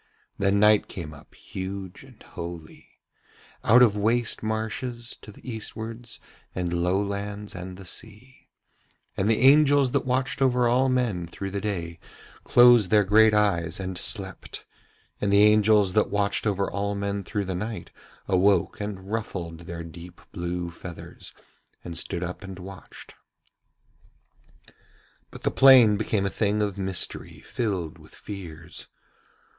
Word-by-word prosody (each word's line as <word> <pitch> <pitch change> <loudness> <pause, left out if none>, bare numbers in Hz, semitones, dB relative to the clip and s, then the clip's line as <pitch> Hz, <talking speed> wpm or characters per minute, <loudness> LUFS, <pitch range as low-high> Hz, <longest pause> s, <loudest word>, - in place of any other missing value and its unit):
Then 100 0 +2
night 105 0 +5
came 80 -4 -7
up, 75 - -16
huge 95 +1 -7
and 130 -4 -17
holy, 85 -2 -9 0.7
out 125 +3 +7
of 110 -4 +4
waste 115 +3 0
marshes 110 +2 -4
to 105 - -11
the 105 - -17
eastwards 115 0 -7 0.4
and 90 -2 -2
low 90 +2 +1
lands 100 +1 -4
and 90 0 -8
the 95 - -11
sea; 110 +7 -9 0.7
and 95 +3 0
the 115 - +2
angels 140 -1 +5
that - - +1
watched 130 +2 -1
over 125 -2 +3
all 130 +3 +3
men 115 -9 0
through 95 +3 -6
the 100 0 -3
day 85 -6 -4 0.4
closed 120 -5 +6
their 105 -1 +5
great 110 +2 +5
eyes 85 -6 +1
and 95 -1 -4
slept, 95 0 -2 0.6
and 100 - +1
the 100 +1 +6
angels 105 -2 +4
that 105 - +2
watched 100 +2 0
over 100 -1 0
all 100 0 -2
men 100 0 -3
through 100 +2 -3
the 95 - -3
night 105 +5 -5 0.4
awoke 100 +2 +2
and 100 -1 -6
ruffled 90 -7 -4
their 85 0 -7
deep 85 +2 -11
blue 85 0 -4
feathers 85 0 -10 0.5
and 85 - -7
stood 85 +2 -3
up 90 +3 -6
and 95 -1 -8
watched. 95 +1 -11 2.2
But - - -12
the - - +1
plain 130 -6 +7
became 100 -1 -1
a 100 - -1
thing 105 0 0
of 100 -2 -2
mystery 95 -3 -3
filled 95 -9 -3
with - - -16
fears. 85 -5 -9
100 Hz, 145 wpm, -25 LUFS, 90-110 Hz, 2.2 s, out